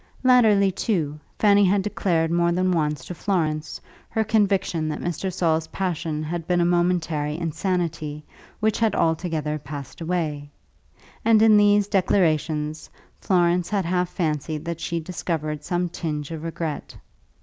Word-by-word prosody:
Latterly, 220 -6 +5
too, 165 -7 -1 0.2
Fanny 205 -1 +5
had 195 +1 +3
declared 170 -5 0
more 170 0 +2
than 185 +1 +1
once 150 -5 -1
to - - -6
Florence 155 -5 -2 0.3
her 220 - 0
conviction 200 -7 +1
that 150 - -3
Mr. 175 +2 -3
Saul's 165 -3 0
passion 165 -5 -3
had 165 +1 -4
been 180 -1 +2
a 170 - +3
momentary 170 -4 0
insanity 165 -3 -2 0.4
which 215 0 +1
had 220 -3 +2
altogether 160 -2 0
passed 140 +1 -8
away; 160 -4 -2 0.7
and 225 -1 +5
in 220 -1 +7
these 205 -1 +4
declarations 155 -6 0 0.3
Florence 175 -1 +2
had 200 -4 0
half 180 0 0
fancied 155 -2 -2
that 170 -1 -4
she 170 +2 -2
discovered 155 -3 -3
some 175 0 -1
tinge 155 -3 -4
of 160 -2 -5
regret. 165 -2 -5
170 Hz, 140 wpm, -24 LUFS, 155-185 Hz, 0.7 s, in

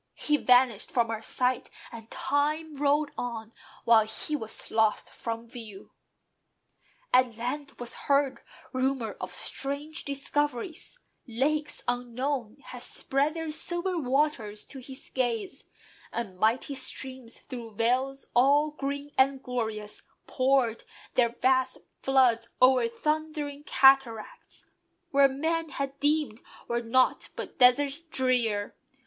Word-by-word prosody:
He 300 - +1
vanished 250 -5 +4
from 235 -2 +1
our 220 -1 -3
sight, 250 +2 0 0.2
and 225 -1 -10
time 300 +3 0
rolled 290 +1 +1
on 230 -2 -4 0.3
While 225 -2 +6
he 260 +7 -3
was 220 -6 -4
lost 220 -1 +2
from 230 0 -5
view. 225 -5 -9 1.2
At 250 -3 +4
length 275 +5 -4
was 245 -1 -3 0.2
heard 280 -1 +2 0.3
Rumour 255 -4 -1
of - - -6
strange 285 +3 -4
discoveries: 290 - -2 0.3
lakes 295 +6 0
unknown 245 0 -2
Had 250 - -9
spread 280 +5 -1
their 325 -1 -3
silver 345 +4 -2
waters 265 -7 0
to 270 - -7
his 260 +1 -9
gaze; 240 -4 -2 0.5
And 195 -6 -5
mighty 230 +7 +2
streams, 260 -2 -3
through 235 -5 -9
vales 260 +5 0
all 285 +5 +4
green 285 0 -4
and 265 0 +3
glorious 220 -4 -3 0.2
Poured 255 -3 +1 0.3
their 240 -2 +4
vast 260 +2 +1 0.2
floods 245 -4 +3
o'er 255 -2 +5
thundering 300 +3 -3
cataracts, 260 -6 +3 0.5
Where 275 0 +6
men 320 +4 -1
had 275 0 -4
deemed 290 -6 +1 0.3
were 235 0 0
nought 255 +2 +2
but - - -7
deserts 275 +4 +5
drear. 250 -9 0
260 Hz, 120 wpm, -28 LUFS, 235-285 Hz, 1.2 s, While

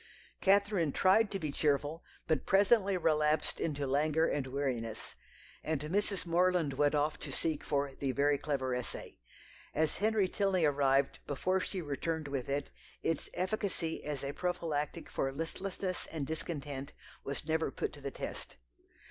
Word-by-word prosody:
Catherine 200 -5 +4
tried 195 +7 +4
to 195 - -2
be 155 -6 -3
cheerful, 145 +2 +1 0.2
but 160 -1 0
presently 200 0 +4
relapsed 155 -2 +2
into 145 -3 -1
languor 150 +4 +2
and 140 -4 0
weariness; 130 -5 -2 0.5
and 155 -2 0
Mrs. 195 +7 0
Morland 175 -3 +3
went 145 +2 +3
off 150 +1 +1
to - - -5
seek 155 -3 -1
for 140 -1 0
the 135 0 -1
"very 140 +1 +2
clever 135 -4 -1
essay." 125 -1 -5 0.6
As 155 +1 +2
Henry 215 -2 +3
Tilney 190 -3 +2
arrived 140 -1 +3
before 185 +7 +1
she 185 -1 -2
returned 155 +2 -2
with 140 -2 -3
it, 140 +1 -1 0.3
its 165 -2 0
efficacy 185 -3 -1
as 145 -2 -3
a 140 +1 -2
prophylactic 165 -5 -2
for 135 - -1
listlessness 185 +5 -3
and 155 -4 -3
discontent 145 -2 -4 0.3
was 140 +2 -4
never 160 -1 +1
put - - -3
to 145 - -11
the 140 - -3
test. - - -6
155 Hz, 150 wpm, -33 LUFS, 140-180 Hz, 0.6 s, Catherine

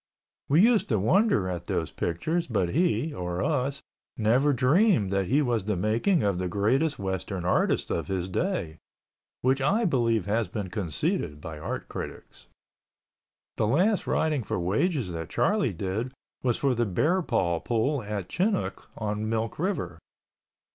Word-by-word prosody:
We 155 +7 +5
used 230 -2 +4
to 110 - +2
wonder 145 - +3
at 85 -2 -4
those - - -2
pictures 160 - -1
but 100 -7 0
he 165 - +1
(or 90 -2 -3
us) 140 -2 -1 0.3
never 125 +7 +3
dreamed 140 - +3
that 100 -2 0
he 145 +9 +3
was 120 -6 0
the 105 -1 0
making 115 - +1
of 100 -3 +1
the 90 - -1
greatest 125 - +1
Western 95 -1 -3
artist 90 - +1
of 85 - -1
his 95 -2 -2
day, 95 - -2 0.6
which 130 +2 +2
I 210 - +2
believe 115 - +1
has 110 +2 0
been 100 -5 -5
conceded 80 -6 -2
by 80 0 -7
art - - -4
critics. - - -8 1.1
The 105 - +2
last 185 - +2
riding 155 -4 +1
for 100 - -3
wages 110 - 0
that 80 -1 -5
Charlie 195 - +1
did 100 +7 -3 0.3
was 120 -3 +1
for 140 -2 +1
the 120 -1 0
Bear 155 - +2
Paw 85 - 0
Pool 125 - 0
at 100 -3 -4
Chinook 195 - -1
on 105 0 -2
Milk 115 +2 -2
River. 120 - -2
115 Hz, 155 wpm, -27 LUFS, 95-150 Hz, 1.1 s, We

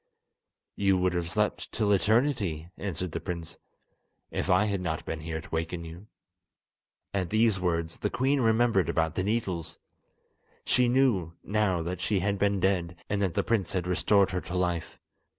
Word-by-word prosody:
"You 95 -2 +3
would 90 0 +1
have 85 -1 -2
slept - - -1
till 105 -2 +1
eternity," 100 - +1
answered 90 -3 -4
the - - -3
prince, 85 -3 -6 0.7
"if - - -2
I 95 +3 +4
had 100 -3 -1
not 80 -3 -3
been 80 - -4
here 80 +1 -4
to - - -14
waken 80 +1 -3
you." 85 +5 -10 1.1
At 95 -3 -1
these 110 -1 +3
words 85 -2 -1
the 105 - 0
queen 135 +4 +1
remembered 115 -4 +3
about 80 -1 +1
the 90 - -1
needles. 95 -7 -2 0.9
She 125 -1 +3
knew 120 -10 +2
now 100 -5 +1
that 90 +1 -4
she 100 +1 +1
had 100 +1 0
been 100 -1 +2
dead, 90 -3 +1 0.2
and 100 -1 0
that 95 -4 0
the - - +2
prince 105 -6 0
had 90 -3 -1
restored 95 +2 +3
her 90 -1 -1
to 90 - -6
life. 90 -3 -1
95 Hz, 170 wpm, -28 LUFS, 85-105 Hz, 1.1 s, I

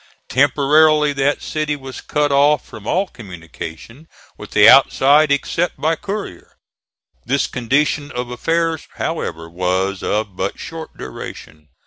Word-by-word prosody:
Temporarily 150 +3 +3
that 140 +1 0
city 155 -1 -2
was 135 -3 -9
cut 150 -1 0
off 140 0 +3
from 105 0 -11
all 190 +3 +1
communication 95 - -10 0.3
with - - -11
the - - +5
outside 145 +2 +6
except 165 +5 0
by 160 +1 +1
courier. 200 - -7 0.7
This 140 +3 0
condition 145 +4 0
of 125 0 -5
affairs, 165 +4 -1
however, 80 +1 -4
was 90 +3 -1
of 105 -3 -2
but 95 +2 -3
short 165 -1 -9
duration. 75 +4 -9
140 Hz, 125 wpm, -19 LUFS, 100-155 Hz, 0.7 s, outside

